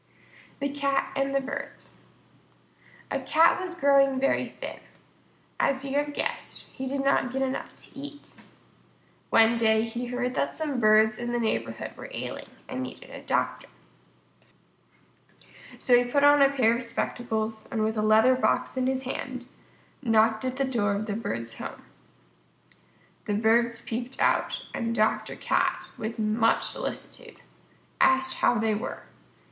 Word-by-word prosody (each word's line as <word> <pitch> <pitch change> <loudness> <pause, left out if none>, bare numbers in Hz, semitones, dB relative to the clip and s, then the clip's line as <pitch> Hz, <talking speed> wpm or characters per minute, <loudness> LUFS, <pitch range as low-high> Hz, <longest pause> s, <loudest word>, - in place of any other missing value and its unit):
_ - - -32
THE 280 - 0
CAT 280 -1 0
AND 275 0 0
THE - - +4
BIRDS 275 +1 -7 1.1
A - - 0
Cat 330 +3 +4
was 360 -1 -5
growing 275 -3 +4
very 275 - +1
thin. - - -8 0.8
As 270 0 +1
you 270 - -4
have 290 0 0
guessed, - - -3
he 265 - -6
did 275 +1 -2
not 275 -2 +2
get 270 +1 -1
enough 265 0 -4
to - - -10
eat. 285 +1 -9 1.0
One 230 +1 +5
day 220 -1 +3
he 235 +2 -4
heard 250 0 -2
that 280 - -1
some 295 -5 -1
Birds 215 0 +4
in 240 0 -3
the 240 - +1
neighborhood 225 -2 -2
were - - -9
ailing - - -5 0.2
and 260 0 -4
needed 255 - -8
a - - -8
doctor. - - -1 2.1
So 250 - +4
he 245 0 +3
put 285 +1 +3
on 290 0 +7
a 275 - +7
pair 245 -5 +3
of 240 - -3
spectacles, 220 -2 -3
and 220 -2 0
with 220 +1 0
a 215 - 0
leather 220 +4 +5
box 255 +1 0
in 255 0 +1
his 265 0 -1
hand, 255 -1 -5 0.6
knocked 225 -2 +3
at 255 0 -2
the 275 - +1
door 220 -6 0
of 210 +2 -2
the 210 - -3
Bird's 115 - -4
home. - - -7 1.4
The 205 - -1
Birds 230 +2 +2
peeped 240 +3 -5
out, - - +1
and 230 0 -2
Dr. 215 0 +1
Cat, - - 0
with 225 +2 -5
much 220 +1 +2
solicitude, - - -5 0.6
asked 265 0 +3
how - - +3
they 220 0 +1
were. 210 - -4
245 Hz, 155 wpm, -27 LUFS, 220-275 Hz, 2.1 s, on